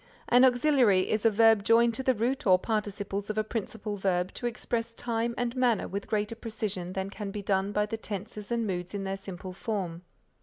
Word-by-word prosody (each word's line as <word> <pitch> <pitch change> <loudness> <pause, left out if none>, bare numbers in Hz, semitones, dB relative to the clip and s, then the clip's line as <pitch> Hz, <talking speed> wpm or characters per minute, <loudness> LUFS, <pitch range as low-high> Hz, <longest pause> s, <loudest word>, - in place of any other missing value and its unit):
An 245 +1 +6
auxiliary 245 -7 +4
is 215 +1 +3
a - - +6
verb 225 -1 +5
joined 230 +2 +4
to 265 - -2
the 260 -1 +2
root 240 +3 -1
or 185 -1 +7
participles 205 -1 -3
of 215 - -3
a 215 - +2
principal 215 -1 -4
verb 185 -2 0
to 240 - -3
express 230 0 -3
time 235 0 -2
and 245 0 -1
manner 245 -4 +2
with 200 +1 -5
greater 210 0 -1
precision 215 -6 -4
than 190 +1 -3
can 205 0 -5
be 205 0 -5
done 195 0 +1
by 210 0 +1
the 225 +2 -4
tenses 210 0 -6
and 235 -1 0
moods 180 -1 -3
in 200 - -3
their 195 0 -2
simple 190 -1 -8
form. 180 -5 -3
210 Hz, 205 wpm, -29 LUFS, 195-230 Hz, -, or